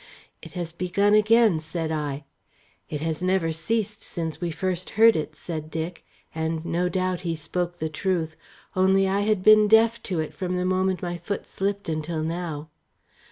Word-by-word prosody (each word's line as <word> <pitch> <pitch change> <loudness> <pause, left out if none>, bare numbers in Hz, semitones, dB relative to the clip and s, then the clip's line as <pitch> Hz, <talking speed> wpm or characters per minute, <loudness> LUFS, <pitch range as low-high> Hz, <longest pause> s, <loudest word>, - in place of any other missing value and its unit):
"It - - -11
has 175 -2 -4
begun 185 +4 +1
again," 215 -3 +5
said 160 0 -3
I. 150 -2 -3 0.7
"It 150 -1 -4
has 160 0 -2
never 180 -3 +1
ceased 210 +5 -1
since 165 -2 -5
we 175 - -1
first 180 +2 -2
heard 225 0 +7
it," 155 - -3
said 155 -3 -6
Dick, 165 +2 -4 0.3
and 160 0 -2
no 175 +2 0
doubt 185 -1 -1
he 170 -2 -2
spoke 175 +3 -3
the 160 - -2
truth; 160 0 -1 0.4
only 190 +1 +4
I 195 +1 +1
had 205 -2 +1
been 215 0 +7
deaf 225 +2 +5
to 180 -4 0
it 155 - -3
from 185 -1 -3
the 180 0 0
moment 185 -1 +1
my 175 -1 -2
foot 200 +3 -4
slipped 200 0 -3
until 155 0 -2
now. 160 -2 -4
180 Hz, 175 wpm, -25 LUFS, 160-195 Hz, 0.7 s, heard